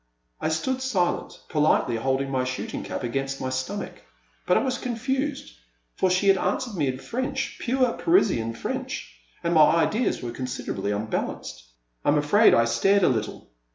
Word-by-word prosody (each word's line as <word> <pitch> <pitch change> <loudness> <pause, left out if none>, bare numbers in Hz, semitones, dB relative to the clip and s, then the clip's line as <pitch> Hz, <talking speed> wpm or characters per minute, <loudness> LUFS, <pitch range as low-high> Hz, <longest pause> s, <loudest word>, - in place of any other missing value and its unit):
'* - - -39
I - - 0
stood 255 +12 -1
silent, 200 -10 -1
politely 150 -6 +2
holding 135 +3 -1
my 130 -1 +1
shooting 130 0 -4
cap - - -5
against 135 +2 -2
my 130 - -2
stomach. 130 +11 -4 0.5
But - - +4
I - - +2
was 255 -2 -1
confused, 265 +4 -2 0.4
for 185 - +2
she 185 +2 +2
had 195 -1 +5
answered 225 +6 -1
me 155 -7 0
in 130 0 -2
French, 255 - -3
pure 255 -1 +1
Parisian 150 - +2
French, - - -5 0.3
and 170 - +1
my 155 0 +6
ideas 215 - +1
were 120 - -3
considerably 120 -6 -4
unbalanced. 105 - -4 0.4
I - - +2
am 145 - +4
afraid 175 +10 +5
I 115 - +4
stared 195 +13 +3
a - - +5
little. 110 -5 -3
155 Hz, 170 wpm, -25 LUFS, -, 0.5 s, my